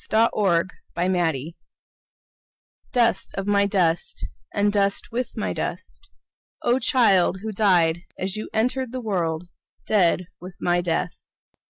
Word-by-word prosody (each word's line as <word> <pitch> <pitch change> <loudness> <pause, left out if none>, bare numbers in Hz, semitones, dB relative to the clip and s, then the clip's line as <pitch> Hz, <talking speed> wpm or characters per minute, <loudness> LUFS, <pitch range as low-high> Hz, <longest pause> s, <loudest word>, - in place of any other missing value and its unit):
Elizabeth 200 -6 +2 0.2
Childers 170 -4 0 1.4
Dust 235 -2 +1
of 195 - -3
my 200 0 +3
dust, 175 - 0 0.3
And 205 0 +1
dust 200 +2 0
with 245 +2 -3
my - - -1
dust, 390 - -6 0.5
O, 245 +2 +3
child 195 -8 +3
who 220 - -3
died 180 -6 +3 0.2
as 190 +1 -2
you 215 - -5
entered 250 +3 0
the 255 - -3
world, 175 -6 -2 0.4
Dead 185 -3 +2
with 180 0 -10
my 175 0 +1
death! 170 -2 -3
195 Hz, 125 wpm, -24 LUFS, 175-220 Hz, 1.4 s, my